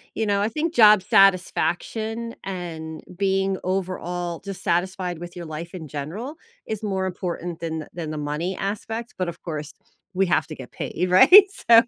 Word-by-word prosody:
you 220 - 0
know, 200 -1 +1
I 210 - +2
think 315 +7 -2
job 210 - +7
satisfaction 195 +5 +2
and 165 -4 -6
being 195 -1 +1
overall 180 -2 -3
dissatisfied 185 -2 -2
with 175 0 -9
your 175 -1 -7
life 160 +3 -7
in 160 -4 -7
general 185 - -5 0.3
is 220 -1 -4
more 190 -2 -1
important 175 -2 -4
than 160 -2 -4
than 160 -3 -5
the 155 - -4
money 150 +5 -2
aspect, 225 +4 -4
but, 185 -1 -1
of 170 - -7
course, 155 -2 -5 0.4
we 190 +1 +2
have 170 - +2
to 155 - -7
get 130 -2 -10
paid, 180 +2 -3
right? 365 - +10 0.3
So, 230 0 +10
185 Hz, 165 wpm, -24 LUFS, 170-200 Hz, 0.4 s, right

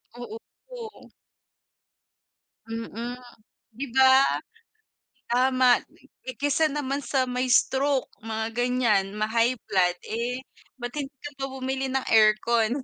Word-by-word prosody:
Oo, 240 -2 -7 0.3
po. 470 -3 -10 1.6
Mm, 230 +2 -5 0.6
'di 280 - -4
ba? 265 +1 +5 0.9
Tama 255 0 +3
ne - - -24 0.2
eh, - - -7
kaysa 290 +2 +2
naman 285 -1 -2
sa 260 +1 0
mai-stroke 260 +2 +2 0.2
mga 220 0 -3
ganyan, 235 -5 +1
ma-high 230 +3 +1
blood, 180 -2 +2
eh, 240 +3 -3 0.4
ba't 245 -1 -6
hindi 285 -2 -5
ka 290 - -3
pa 270 - -2
bumili 265 0 -3
ng 265 0 -1
aircon. 225 +3 +4
250 Hz, 110 wpm, -26 LUFS, 230-265 Hz, 1.6 s, ba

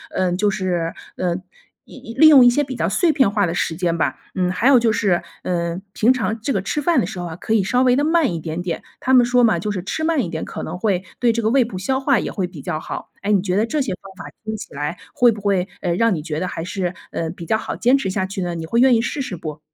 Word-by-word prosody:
呃 185 -1 +1
就 205 +3 +2
是， 180 -4 -1 0.2
呃， 180 -2 0 0.5
一 - - -14 0.2
一 - - -7
利 310 +4 +7
用 280 -5 +9
一 - - +8
些 290 +5 +2
比 265 -2 -6
较 - - 0
碎 345 -3 +2
片 265 -8 +3
化 205 -1 +1
的 165 - -2
时 170 -1 -1
间 170 -1 0
吧。 - - 0 0.2
嗯， 180 -2 +1
还 205 +7 +1
有 270 -3 +7
就 230 -1 +2
是， 200 -5 +1 0.2
嗯， 170 0 -2
平 230 +4 +4
常 230 -3 -2
这 275 - -1
个 195 - 0
吃 295 +10 -2
饭 335 +3 +3
的 - - +1
时 190 0 -6
候 175 - -4
啊， 165 -2 -6
可 220 - -3
以 215 -3 +3
稍 250 +6 +2
微 250 -1 +4
地 285 - +1
慢 320 - +2
一 165 - -3
点 160 +2 -4
点， 175 -1 -4 0.2
他 260 - 0
们 250 -2 +7
说 245 0 +3
嘛， 225 - +3
就 210 - -3
是 185 -3 -4
吃 315 - -3
慢 315 -5 +1
一 175 - -4
点， 160 -1 -4
可 - - -6
能 170 +3 -5
会 190 -2 0 0.2
对 240 -2 +3
这 230 - -1
个 220 - +1
胃 265 0 +4
部 215 -5 -7
消 265 +8 -1
化 270 -3 +2
也 - - -3
会 185 -2 -2
比 170 -5 -11
较 155 - -3
好。 - - -7
哎， 205 +1 -1
你 200 - +4
觉 185 -1 -1
得 210 +3 +2
这 285 +6 -1
些 255 - -2
方 195 - -12
法 - - -9
听 220 0 -4
起 - - -10
来 145 +4 -3 0.2
会 240 -1 +5
不 215 - -6
会， 195 -2 +1
呃， 175 -2 0
让 230 +3 +3
你 155 - -4
觉 155 -1 -3
得 185 - -2
还 165 - -5
是 180 0 -3 0.2
呃， 165 - -3
比 170 0 -8
较 220 - +1
好 - - -5
坚 250 +4 +3
持 270 - -2
下 190 0 -1
去 190 0 -5
呢？ 175 -1 -2
你 165 -1 -5
会 230 +8 0
愿 255 0 +6
意 225 - +2
试 275 +5 -3
试 230 -8 -4
不？ 155 -2 -7
200 Hz, 320 characters per minute, -20 LUFS, 175-245 Hz, 0.5 s, 用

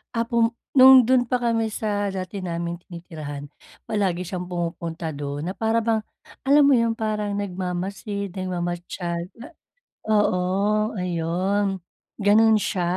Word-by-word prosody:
Ah, 230 - +2
pum 235 -1 +3 0.3
nung 265 +1 +10
dun 255 -1 +4
pa 250 -1 0
kami 225 -2 0
sa 205 -2 -1
dati 190 +2 -5
naming 170 -2 -3
tinitirahan, 155 -5 -8 0.4
palagi 190 -5 0
siyang 180 0 -4
pumupunta 170 -2 -4
dun 145 -1 -5
na - - -3
para 225 +1 +1
bang 220 -1 +1 0.4
alam 285 +2 +6
mo - - +6
yung 230 -1 +2
parang 215 -2 -2
nagmamasid, 195 +1 -4
nagmamatiyag 175 -1 -3 0.2
na 275 - -8 0.6
oo, 210 -4 +3 0.6
ayun, 185 +2 -1 0.3
ganon 220 +2 +4
siya. 185 -3 -1
190 Hz, 130 wpm, -24 LUFS, 175-220 Hz, 0.6 s, nung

